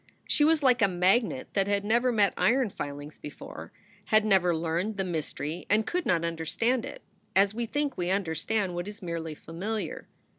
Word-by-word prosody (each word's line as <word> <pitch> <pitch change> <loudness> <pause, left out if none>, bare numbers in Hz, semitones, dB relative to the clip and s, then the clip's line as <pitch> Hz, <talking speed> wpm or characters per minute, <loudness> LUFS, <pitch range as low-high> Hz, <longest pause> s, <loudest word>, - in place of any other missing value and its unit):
She 295 - +3
was 310 0 +4
like 255 -2 +4
a 200 - +6
magnet 195 +8 +1
that 195 -1 +1
had 200 0 0
never 235 +4 +3
met 210 -4 +3
iron 250 -2 +2
filings 145 -1 -7
before, 150 - -9 0.3
had 215 0 +3
never 185 -4 +3
learned 170 +6 -1
the 195 - 0
mystery 160 -2 -4
and 215 +1 +3
could 360 0 -2
not 170 -2 +2
understand 225 +10 0
it, - - -9 0.3
as 195 +1 +4
we 235 +1 -3
think 290 -1 -2
we 175 0 0
understand 190 +2 0
what 175 +2 -4
is 205 -1 -8
merely 165 -2 -4
familiar. 200 +9 -5
200 Hz, 180 wpm, -28 LUFS, 170-230 Hz, 0.3 s, a